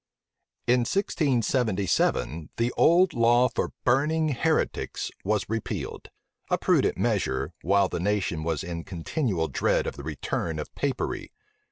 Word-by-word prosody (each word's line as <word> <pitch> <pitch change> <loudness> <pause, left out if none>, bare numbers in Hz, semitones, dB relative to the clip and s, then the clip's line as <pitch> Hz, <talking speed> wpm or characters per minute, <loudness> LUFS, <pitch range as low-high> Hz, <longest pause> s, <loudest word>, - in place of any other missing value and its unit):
In 125 +1 +4
1677, 120 - 0
the 115 +1 +1
old 175 +3 +5
law 120 +1 +4
for - - -2
burning 155 +5 +2
heretics 155 +4 -1
was 105 +1 0
repealed; 115 0 -4 0.4
a - - +2
prudent - - +2
measure, 65 0 0
while 100 +2 +3
the - - -4
nation 90 -3 0
was 80 -2 -1
in 85 -1 -5
continual 95 - -2
dread - - +1
of - - -4
the 70 - -7
return 80 +1 -3
of 75 - -6
Papery. 235 - -2
115 Hz, 130 wpm, -26 LUFS, 85-135 Hz, 0.4 s, old